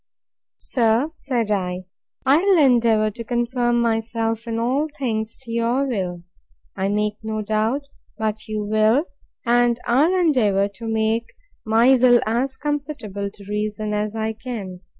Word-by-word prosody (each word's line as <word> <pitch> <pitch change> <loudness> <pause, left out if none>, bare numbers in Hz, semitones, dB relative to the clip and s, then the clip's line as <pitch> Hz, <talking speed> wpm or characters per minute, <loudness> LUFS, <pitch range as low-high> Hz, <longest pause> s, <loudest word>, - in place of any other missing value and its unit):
Sir, 240 +4 +1
said 245 -8 -2
I, 185 -2 -2 0.4
I 270 +2 +5
will 390 0 +4
endeavour 230 -6 +4
to 230 +3 -7
conform 240 0 0
myself, 225 0 -1
in 225 -1 -2
all 260 +6 +1
things, 220 -4 -2
to 235 - -8
your 235 +4 +1
will. 180 -8 -3 0.5
I 190 0 -1
make 210 +1 0
no 220 -1 -3
doubt 220 +7 0 0.3
but 215 -1 -3
you 215 -1 -3
will: 215 +7 +3 0.4
and 240 0 +3
I'll 310 +10 +3
endeavour 215 - +2
to 225 +3 -9
make 225 +1 0 0.4
my 230 +4 +5
will 245 -1 +6
as 250 +5 -1
conformable 280 -9 -3
to 200 0 -15
reason 210 0 -2
as 210 +1 -2
I 220 0 -1
can. 215 -6 -7
225 Hz, 145 wpm, -22 LUFS, 215-245 Hz, 0.5 s, will